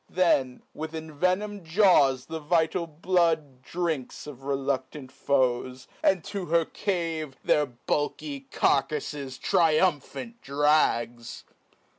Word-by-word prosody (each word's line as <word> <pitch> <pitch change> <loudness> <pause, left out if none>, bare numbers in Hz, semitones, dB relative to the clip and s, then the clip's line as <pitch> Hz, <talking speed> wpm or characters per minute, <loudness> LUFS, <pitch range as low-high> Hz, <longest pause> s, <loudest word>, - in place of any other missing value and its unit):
47 185 0 +1
Then, 130 -6 +1
with 160 +1 -6
envenom'd 185 +6 -2
jaws 160 -8 +4
the 160 - -5
vital 165 +2 +1
blood 160 -4 0
Drinks 160 -3 -3
of 140 -3 -10
reluctant 135 0 -3
foes, 130 -2 0
and 190 -3 +2
to 200 -3 -5
her 165 0 +3
cave 165 -8 -3
Their 150 -1 +3
bulky 140 +3 -3
carcafles 140 -2 0
triumphant 180 - +1
drags. 135 -5 +1
150 Hz, 105 wpm, -27 LUFS, 135-170 Hz, -, jaws